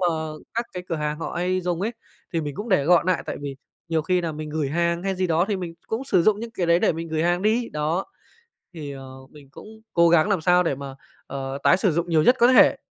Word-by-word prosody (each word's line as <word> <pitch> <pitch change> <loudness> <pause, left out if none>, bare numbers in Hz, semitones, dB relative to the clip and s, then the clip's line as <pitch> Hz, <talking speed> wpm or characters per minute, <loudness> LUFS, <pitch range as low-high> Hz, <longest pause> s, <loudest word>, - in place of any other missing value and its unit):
mà 180 - +2 0.5
các 235 +1 -1
cái 180 - -5
cửa 165 - -1
hàng 150 0 -3
họ 165 - -5
hay 185 +1 0
dùng 175 -1 -2
ấy, 225 +4 -1 0.4
thì 165 - 0
mình 145 -2 -5
cũng 210 +8 -6
để 185 -9 +3
gọn 175 0 +4
nại 180 -5 +1
tại - - -4
vì 140 -2 -6 0.3
nhiều 160 -2 0
khi 180 +2 +1
nà 165 -2 -3
mình 155 0 -6
gửi 150 -2 -1
hàng 170 +3 0
hay 195 -1 -1
gì 185 0 0
đó, 165 +1 +2
thì 205 - 0
mình 175 -3 -6
cũng 225 +4 -3
sử 190 -10 +2
dụng 210 +3 +3
những 235 - -6
cái 180 -6 -2
đấy 170 +1 +4
để - - +2
mình 165 +1 -6
gửi 155 0 -1
hàng 175 +2 +1
đi, 230 +3 +1
đó. 155 +5 -1 0.7
Thì, 150 -4 -7
ờ, 135 -1 -9 0.2
mình 145 -3 -16
cũng - - -12 0.3
cố 170 -1 +5
gắng 170 +3 +4
làm 195 -6 +1
sao 180 +2 +4
để 155 - 0
mà, 135 0 -8 0.3
ờ, 135 0 -5
tái 185 - +5
sử 190 -2 +2
dụng 170 +2 -1
nhiều 155 -2 +3
nhất 250 - +5
có 240 - +6
thể. - - +6
170 Hz, 270 wpm, -24 LUFS, 155-185 Hz, 0.7 s, có